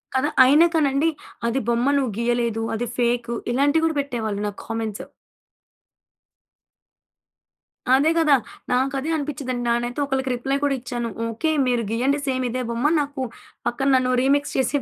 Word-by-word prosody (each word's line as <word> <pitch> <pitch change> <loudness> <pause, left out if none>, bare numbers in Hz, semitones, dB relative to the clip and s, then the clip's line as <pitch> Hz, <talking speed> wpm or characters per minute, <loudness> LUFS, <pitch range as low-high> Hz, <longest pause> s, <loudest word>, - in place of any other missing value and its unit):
కదా! 260 +3 +2
అయినా 300 +6 +6
కానండి 290 0 +2 0.4
అది 235 +3 0
బొమ్మ 235 +3 +1
నువ్వు 260 -5 0
గీయలేదు, 235 -1 0
అది 240 +2 -2
ఫేకు, 240 -1 0 0.2
ఇలాంటివి 285 +5 +2
కూడా 320 -2 0
పెట్టేవాళ్ళు 220 -7 -3
నాకు 205 - -7
కామెంట్స్. 225 -2 -4 2.9
అదే 285 +4 +3
కదా! 310 -3 +4 0.4
నాకు 260 +2 +1
అదే 295 - -4
అనిపించిందండి. 280 -5 -3
నానైతే 240 +3 -1
ఒకళ్ళకి 265 -1 -1
రిప్లై 270 +3 -1
కూడా 285 -1 +2
ఇచ్చాను. 240 -1 -4 0.2
"ఓకే, 230 +8 -1 0.2
మీరు 245 -2 +1
గీయండి 260 +5 +1
సేమ్ 260 -1 0
ఇదే 255 +2 -2
బొమ్మ. 235 +3 -2 0.2
నాకు 285 -1 -5 0.5
పక్కన 270 +3 -1
నన్ను 255 0 +2
రీమిక్స్ 285 +2 +1
చేసి 265 +2 +1
255 Hz, 140 wpm, -23 LUFS, 235-280 Hz, 2.9 s, అయినా